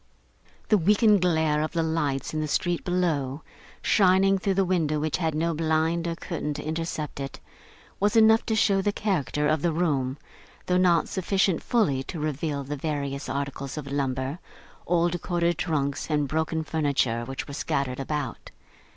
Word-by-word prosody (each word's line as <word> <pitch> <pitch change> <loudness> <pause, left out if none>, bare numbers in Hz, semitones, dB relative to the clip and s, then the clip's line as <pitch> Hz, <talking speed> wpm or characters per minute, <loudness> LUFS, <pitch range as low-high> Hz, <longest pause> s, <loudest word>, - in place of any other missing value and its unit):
The 215 - +5
weakened 210 +3 +4
glare 160 -4 +2
of 155 - -2
the 165 -1 +1
lights 150 -4 -1
in 155 - -1
the 155 - -2
street 175 +3 0
below, 160 -6 -1 0.4
shining 195 0 +4
through 195 0 0
the 195 0 +3
window 160 -5 +1
which 155 0 -1
had 160 -3 -1
no 165 +2 0
blind 160 +2 0
or 165 - -2
curtain 150 -4 -4
to - - -5
intercept 155 -2 -4
it, 135 -1 -6 0.6
was 205 +2 +2
enough 220 0 +6
to 220 - +1
show 200 -3 +3
the 205 - +1
character 150 - -1
of 155 -1 +1
the 170 - +1
room, 145 -5 0 0.5
though 180 - +2
not 175 -2 +3
sufficient 190 -1 +1
fully 195 - +1
to 165 - -6
reveal 150 -1 -2
the 145 +2 -4
various 140 -2 -3
articles 140 +1 -4
of 140 -2 -6
lumber, 135 +2 -2 0.5
old 175 0 +1
corded 175 -2 0
trunks 140 -3 -1
and 150 -2 +1
broken 160 +2 -1
furniture, 140 -7 0
which 135 +3 -5
were 140 - -7
scattered 140 -3 -2
about. 145 0 -4
160 Hz, 170 wpm, -26 LUFS, 140-175 Hz, 0.6 s, enough